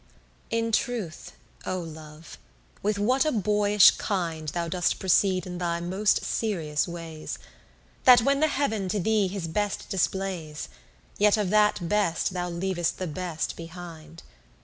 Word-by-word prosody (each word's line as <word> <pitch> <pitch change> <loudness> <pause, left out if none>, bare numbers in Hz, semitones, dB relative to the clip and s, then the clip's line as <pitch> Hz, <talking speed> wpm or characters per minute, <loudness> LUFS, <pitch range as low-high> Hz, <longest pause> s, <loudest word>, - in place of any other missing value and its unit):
11 230 0 0
In 230 - -2
truth, 220 -7 -2 0.3
oh 185 - -2
Love, 155 -1 -10 0.4
with 205 +1 0
what 250 +6 +2
a 310 - +1
boyish 210 -2 +5
kind 165 -6 -2
Thou 170 +2 -2
doest 175 +1 0
proceed 185 -1 +2
in 180 -1 -6
thy 170 -1 -1
most 190 +5 +1
serious 165 -10 -1
ways: 165 -2 -6 0.7
That 245 -1 +9
when 275 +2 +2
the 310 - +4
heav'n 220 -10 -1
to 205 - 0
thee 210 +1 +2
his 185 -3 -4
best 205 +4 -2
displays, 185 -5 -2 0.5
Yet 210 +1 +5
of 205 -3 -1
that 210 -4 +3
best 195 -2 +1
thou 180 -1 -2
leav'st 175 0 -1
the 185 - -3
best 170 -1 -3
behind. 165 -1 -10
185 Hz, 150 wpm, -26 LUFS, 170-210 Hz, 0.7 s, That